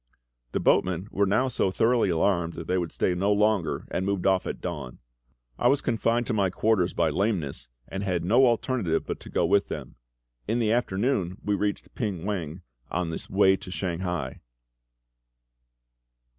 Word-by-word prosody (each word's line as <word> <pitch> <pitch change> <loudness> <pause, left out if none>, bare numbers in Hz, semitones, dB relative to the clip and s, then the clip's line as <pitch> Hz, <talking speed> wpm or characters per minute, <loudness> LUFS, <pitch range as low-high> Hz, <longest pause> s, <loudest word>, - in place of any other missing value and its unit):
The - - +1
boatmen 90 +1 +2
were 100 0 +2
now 110 +7 +2
so 115 -6 0
thoroughly 115 +2 +2
alarmed 85 0 +1
that 85 - -7
they 90 +3 +1
would 85 -2 -3
stay 90 - +1
no 95 +3 +1
longer, 105 -3 +1
and 95 - -1
moved 100 -1 -1
off 95 -1 +2
at - - -4
dawn. 60 - -5 0.6
I - - +3
was 140 +3 +4
confined 115 0 +1
to 120 - -1
my 100 -3 +2
quarters 95 -1 +1
by 80 -2 +2
lameness, 85 - -1 0.2
and 95 - -5
had 90 -4 -1
no 120 +7 +5
alternative 115 -7 0
but - - -4
to - - -11
go - - +1
with 100 - +3
them. - - -7 0.5
In 115 +3 +1
the 110 -3 +1
afternoon 105 -4 0
we 105 - +1
reached 100 0 -2
Ping 95 -7 -3
wang, 90 -4 -4 0.3
on 85 -1 -2
the - - -5
way 95 0 +5
to - - -10
Shanghai. 90 -6 -3
95 Hz, 170 wpm, -26 LUFS, 90-110 Hz, 0.6 s, no